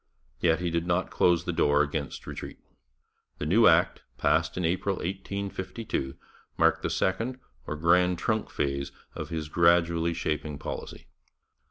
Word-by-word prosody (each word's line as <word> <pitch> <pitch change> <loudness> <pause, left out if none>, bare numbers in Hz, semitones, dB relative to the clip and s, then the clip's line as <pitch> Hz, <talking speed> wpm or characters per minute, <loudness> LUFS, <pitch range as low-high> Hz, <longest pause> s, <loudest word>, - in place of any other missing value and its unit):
Yet 80 +4 +2
he 90 -1 -1
did 85 +1 -1
not 90 +1 0
close 85 -1 +3
the 90 - -1
door 75 -2 +3
against 75 -1 -4
retreat. - - -7 0.8
The - - -4
new 110 +9 +5
Act, - - +4 0.2
passed - - +1
in 90 - 0
April 95 +3 0
1852, 95 - -4 0.4
marked - - +3
the - - -1
second 115 +7 -1 0.3
or 75 - -3
Grand 90 +3 +3
Trunk 110 +4 -1
phase 70 -1 -2 0.2
of - - -6
his 80 -2 -3
gradually 85 0 +3
shaping 75 -3 -2
policy. 75 - -7
85 Hz, 145 wpm, -28 LUFS, 75-90 Hz, 0.8 s, new